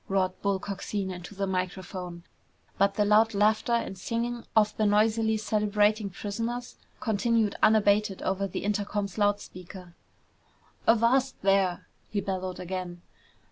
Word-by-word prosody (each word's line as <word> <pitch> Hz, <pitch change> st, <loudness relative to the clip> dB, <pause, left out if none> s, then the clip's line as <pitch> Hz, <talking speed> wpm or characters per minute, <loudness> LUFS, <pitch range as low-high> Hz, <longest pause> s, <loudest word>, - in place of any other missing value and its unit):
roared 190 Hz, -1 st, +1 dB
Bull 200 Hz, -1 st, +1 dB
Coxine 195 Hz, 0 st, -4 dB
into 180 Hz, +2 st, -9 dB
the 200 Hz, 0 st, -1 dB
microphone, 185 Hz, -2 st, -4 dB, 0.6 s
but 200 Hz, 0 st, +3 dB
the 210 Hz, -, +2 dB
loud 215 Hz, +1 st, +4 dB
laughter 215 Hz, +3 st, +2 dB
and 235 Hz, -4 st, 0 dB
singing 235 Hz, +5 st, -3 dB
of 215 Hz, -1 st, +4 dB
the 215 Hz, -, +2 dB
noisily 220 Hz, +1 st, +3 dB
celebrating 210 Hz, 0 st, +1 dB
prisoners 230 Hz, +6 st, -4 dB, 0.2 s
continued 225 Hz, -2 st, +1 dB
unabated 210 Hz, -2 st, +3 dB
over 195 Hz, +1 st, 0 dB
the 185 Hz, -, -5 dB
intercom's 205 Hz, 0 st, -2 dB
loud 205 Hz, 0 st, +3 dB
speakers. 180 Hz, -1 st, -11 dB, 0.9 s
"Avast 240 Hz, +4 st, +3 dB
there!" 195 Hz, -2 st, +2 dB, 0.2 s
he 205 Hz, -, -1 dB
bellowed 185 Hz, -2 st, -3 dB
again. 180 Hz, -1 st, -5 dB
205 Hz, 130 wpm, -28 LUFS, 190-220 Hz, 0.9 s, loud